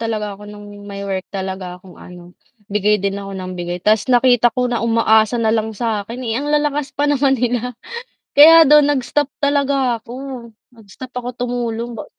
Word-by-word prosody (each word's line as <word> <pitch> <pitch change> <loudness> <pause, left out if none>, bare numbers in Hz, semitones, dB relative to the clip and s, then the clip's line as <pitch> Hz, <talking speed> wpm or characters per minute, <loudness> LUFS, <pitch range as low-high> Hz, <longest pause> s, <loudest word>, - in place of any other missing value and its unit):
talaga 215 -3 -3
ako 205 +1 -12
no'ng 205 0 -12
may 200 0 -7
work 190 -1 -4
talaga 190 -2 -6
akong 180 0 -17
ano, 180 0 -13 0.4
bigay 210 +1 +2
din 200 0 -3
ako 195 -1 -7
ng 185 -1 -6
bigay 175 0 -4
ta's 210 +6 +1
nakita 245 -1 +4
ko 250 - +1
na 245 -1 -1
umaasa 225 -1 +2
na 225 -2 +1
lang 220 -1 -2
sa'kin, 225 0 -3
eh, 225 - -2
ang 290 - -4
lalakas 295 -1 -1
pa 285 - 0
naman 280 -2 +2
nila. 245 0 -2 0.6
Kaya 325 +3 +9
do'n 300 -1 +7
nag-stop 275 +2 -1 0.2
talaga 280 -3 +1
ako. 230 +1 -12 0.6
Nag-stop 225 +1 -13
ako 245 0 -4
tumulong 240 -1 -4
ba - - -7
230 Hz, 175 wpm, -18 LUFS, 200-250 Hz, 0.6 s, Kaya